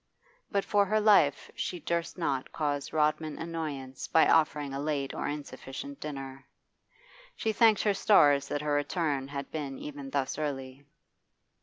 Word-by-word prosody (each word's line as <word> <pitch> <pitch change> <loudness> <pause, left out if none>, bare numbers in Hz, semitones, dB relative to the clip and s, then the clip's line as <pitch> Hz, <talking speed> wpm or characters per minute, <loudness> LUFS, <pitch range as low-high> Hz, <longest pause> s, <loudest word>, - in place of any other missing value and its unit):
But 200 -2 0
for 205 -1 +3
her 215 +2 +2
life 195 -10 +4
she 180 - -4
durst 170 +2 -2
not 135 -7 -2
cause 145 -2 -2
Rodman 155 0 0
annoyance 150 -6 -5
by 160 - +5
offering 150 -3 +2
a 135 - -3
late 145 -2 -2
or - - -3
insufficient 145 - -6
dinner. 135 -2 -7 0.9
She 220 - -1
thanked 220 -1 +4
her 205 - +3
stars 145 -9 +5
that 145 - -2
her 150 -1 0
return 145 -2 0
had 140 0 -6
been 145 -4 -4
even 145 -2 -7
thus 135 +1 -2
early. 135 -2 -5
145 Hz, 150 wpm, -29 LUFS, 140-165 Hz, 0.9 s, by